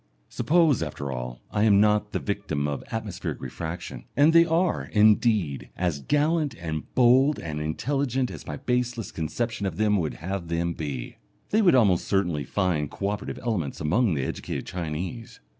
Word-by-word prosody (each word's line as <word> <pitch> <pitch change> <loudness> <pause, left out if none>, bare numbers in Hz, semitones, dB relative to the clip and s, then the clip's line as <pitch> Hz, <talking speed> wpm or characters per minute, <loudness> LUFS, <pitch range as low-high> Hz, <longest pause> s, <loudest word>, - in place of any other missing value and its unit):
Suppose, 160 - +3
after 70 -3 -4
all, - - -6
I 105 - 0
am 105 -2 +5
not 105 0 +3
the - - -1
victim 100 -8 -2
of 70 -1 -3
atmospheric - - -4
refraction, 80 +6 -6
and 150 +3 +6
they 165 0 +7
are, 170 +1 +1
indeed, 105 - +2
as 85 -6 -1
gallant 150 - +1
and 80 -2 -5
bold 130 +4 +5
and 75 -2 -5
intelligent 130 - -1
as - - -9
my - - -4
baseless 125 -4 -1
conception 100 +6 -2
of 85 - -5
them 105 -1 +3
would 80 -5 -2
have 90 +1 -4
them 85 +1 -1
be! 70 -7 -5 0.3
They 220 - +4
would 180 -9 +5
almost 100 -8 +4
certainly 90 -8 0
find 85 -4 0
co 100 - -3
operative 105 0 -4
elements 95 - -2
among 90 +5 +2
the 70 - -1
educated - - -4
Chinese.... 90 +6 -5
100 Hz, 165 wpm, -26 LUFS, 80-125 Hz, 0.3 s, they